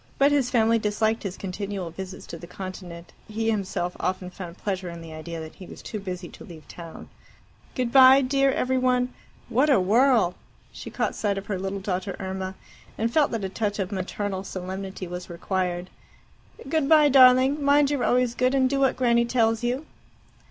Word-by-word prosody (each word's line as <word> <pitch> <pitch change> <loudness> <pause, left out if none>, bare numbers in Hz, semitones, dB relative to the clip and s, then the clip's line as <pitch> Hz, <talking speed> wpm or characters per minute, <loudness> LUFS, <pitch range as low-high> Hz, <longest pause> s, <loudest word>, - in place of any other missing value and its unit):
But 280 +1 +4
his 280 -4 +2
family 230 -2 +3
disliked 220 +1 0
his 195 -2 -5
continual 195 -2 -5
visits 190 +2 -8
to 170 - -8
the 175 - -10
Continent, 180 -2 -9
and 215 - -13
he 225 0 +1
himself 185 -4 -2
often 185 0 -2
found 180 -1 -9
pleasure 190 -3 -3
in 170 0 -8
the 165 -1 -10
idea 165 +1 -7
that 160 0 -8
he 185 - -12
was - - -11
too 215 - -5
busy 180 -2 -6
to - - -13
leave 160 -3 -13
town. 170 -2 -10 0.7
"Good 250 -3 -1
bye, 265 +1 +8
dear 275 +1 +2
every 260 0 0
one. 250 0 +1 0.3
What 255 +5 +2
a 270 - +5
whirl!" 220 0 +3 0.4
She - - -9
caught - - -2
sight 205 -2 -1
of 195 - -5
her 200 -3 -3
little 195 +1 -3
daughter 190 0 -3
Irma, 190 0 -4 0.4
and 230 +1 -1
felt 300 -3 +4
that 225 -4 -3
a - - -3
touch 205 +1 -2
of 195 -1 -3
maternal 195 0 -3
solemnity 190 0 -6
was 180 +1 -7
required. 180 0 -3 0.8
"Good 295 -1 0
bye, 305 -2 +7
darling. 260 +2 +6
Mind 285 0 +4
you're 285 -4 0
always 250 -1 +2
good, 255 +2 +1
and 260 -1 +3
do 275 +1 -1
what 270 -1 +2
Granny 235 -2 +3
tells 225 -1 +1
you." 250 +5 -1
205 Hz, 195 wpm, -25 LUFS, 185-255 Hz, 0.8 s, bye